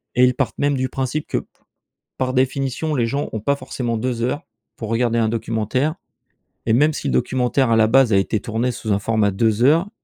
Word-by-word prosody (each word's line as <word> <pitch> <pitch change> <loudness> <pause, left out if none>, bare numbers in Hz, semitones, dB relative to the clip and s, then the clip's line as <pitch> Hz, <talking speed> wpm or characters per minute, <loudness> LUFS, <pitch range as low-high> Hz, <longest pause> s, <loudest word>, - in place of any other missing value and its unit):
et 125 +1 +6
ils 125 - +2
partent 135 - -2
même 145 0 +2
du 130 -1 -1
principe 135 +3 -3
que, - - -1
p - - -13 0.7
par 130 0 -1
définition, 135 +3 0
les 120 -4 +1
gens 140 +5 -2
ont 110 - -3
pas 140 +6 +1
forcément 120 -4 -3
2 120 0 -2
heures 145 +7 -1 0.3
pour 110 - -6
regarder 115 0 +1
un 110 - +2
documentaire 115 +6 -1 0.7
et 110 - +2
même 150 +6 +4
si 145 - -4
le - - 0
documentaire 125 0 +1
à 115 - +4
la 110 -1 +5
base 125 -1 +4
a 100 - +5
été 100 +3 0
tourné 115 +3 -1
sous 110 -2 -4
un 100 - +1
format 105 -1 +1
2 110 +3 +1
heures, 165 +8 +4
125 Hz, 220 wpm, -21 LUFS, 115-135 Hz, 0.7 s, et